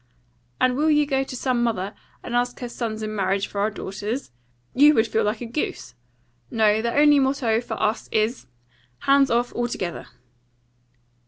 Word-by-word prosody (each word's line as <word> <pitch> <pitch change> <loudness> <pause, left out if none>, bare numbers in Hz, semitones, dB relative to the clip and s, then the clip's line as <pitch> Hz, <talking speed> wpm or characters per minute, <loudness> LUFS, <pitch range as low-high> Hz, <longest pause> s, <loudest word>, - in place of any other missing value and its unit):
And 255 -1 +3
will 305 +4 +2
you 300 -1 +4
go 270 -2 0
to 265 - -8
some 250 -1 0
mother, 210 -4 -1 0.3
and 240 - -4
ask 245 0 0
her 245 - -4
sons 220 -2 -4
in 215 0 -4
marriage 195 0 0
for 200 - -4
our 210 - +2
daughters? 210 - -5 0.4
You 295 +3 +6
would 220 - +4
feel 220 0 0
like 210 +2 -1
a - - -4
goose. 230 - -4 0.6
No; 220 -1 +2
the 235 +1 -1
only 295 0 +6
motto 265 -4 +1
for 240 - -6
us 215 +3 -1
is, 215 - 0 0.5
Hands 275 -1 +4
off 240 +1 0
altogether." 240 -7 -3
235 Hz, 170 wpm, -23 LUFS, 215-265 Hz, 0.6 s, You